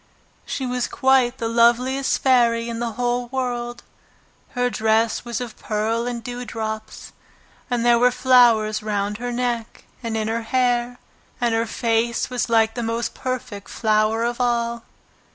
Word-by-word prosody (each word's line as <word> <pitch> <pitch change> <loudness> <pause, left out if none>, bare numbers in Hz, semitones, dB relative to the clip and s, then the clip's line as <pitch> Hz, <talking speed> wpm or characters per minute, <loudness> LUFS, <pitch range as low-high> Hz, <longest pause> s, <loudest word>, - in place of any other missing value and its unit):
She 265 - -3
was 250 -1 -1
quite 260 -2 +2
the 230 -3 -2
loveliest 240 +4 +2
fairy 235 -3 +3
in 230 -1 -4
the 235 -1 -2
whole 245 +1 -1
world. 240 -1 -3 0.7
Her 245 0 +2
dress 220 0 +1
was 235 -2 -4
of 245 -3 -7
pearl 225 +2 -1
and 240 -1 -4
dew 245 +1 -5
drops, 220 -2 -6 0.6
and 240 -1 0
there 240 -1 +5
were 250 +1 +5
flowers 240 -4 +4
round 205 0 -2
her 245 0 -3
neck 240 -2 -3 0.2
and 230 -2 -3
in 215 -1 -1
her 230 +1 -1
hair, 245 0 0 0.4
and 240 -1 +1
her 225 0 0
face 230 +2 0
was 250 -1 -1
like 225 -1 +3
the 240 - -4
most 230 0 -2
perfect 245 -6 -5
flower 215 0 +1
of 240 +1 -1
all. 235 -1 0
235 Hz, 155 wpm, -22 LUFS, 225-245 Hz, 0.7 s, there